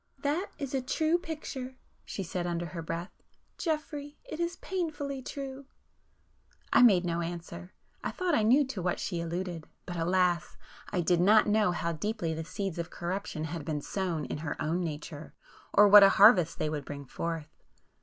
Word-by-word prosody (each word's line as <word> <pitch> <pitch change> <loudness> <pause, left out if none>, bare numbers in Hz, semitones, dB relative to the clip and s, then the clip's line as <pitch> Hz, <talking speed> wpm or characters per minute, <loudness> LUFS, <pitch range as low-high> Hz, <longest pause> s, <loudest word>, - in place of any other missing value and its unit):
"That 305 +7 0
is 280 -2 -5
a 265 - +1
true 315 +6 +1
picture!" 270 -6 -6 0.3
she 195 - -5
said 175 0 -3
under 175 0 -2
her 170 0 -6
breath—"Geoffrey, 290 - -5
it 310 - -8
is 345 0 -1
painfully 295 -7 -3
true!" 270 0 -7 1.1
I - - +7
made 195 -7 +6
no 170 0 -1
answer,—I 175 +1 -7
thought 365 -2 -1
I 230 - +4
knew 255 +7 +5
to 235 -8 -5
what 180 0 -1
she 175 -3 -2
alluded; 170 0 -4 0.2
but 175 -1 -5
alas!—I 175 +1 -1
did 175 0 +2
not 210 +4 +6
know 210 -2 +3
how 170 -1 -1
deeply 170 0 -2
the 160 +1 -4
'seeds 190 +1 -4
of 170 - -3
corruption' 175 -3 -4
had 160 0 -4
been 150 0 -2
sown 175 -6 -2
in - - -4
her 155 -1 -4
own 165 +4 0
nature, 150 -1 -6 0.4
or 205 0 +7
what 205 +1 +10
a 195 - +9
harvest 195 -5 +6
they 155 - -1
would 150 -2 -3
bring 140 0 -7
forth. 160 +2 -4
180 Hz, 170 wpm, -30 LUFS, 170-260 Hz, 1.1 s, what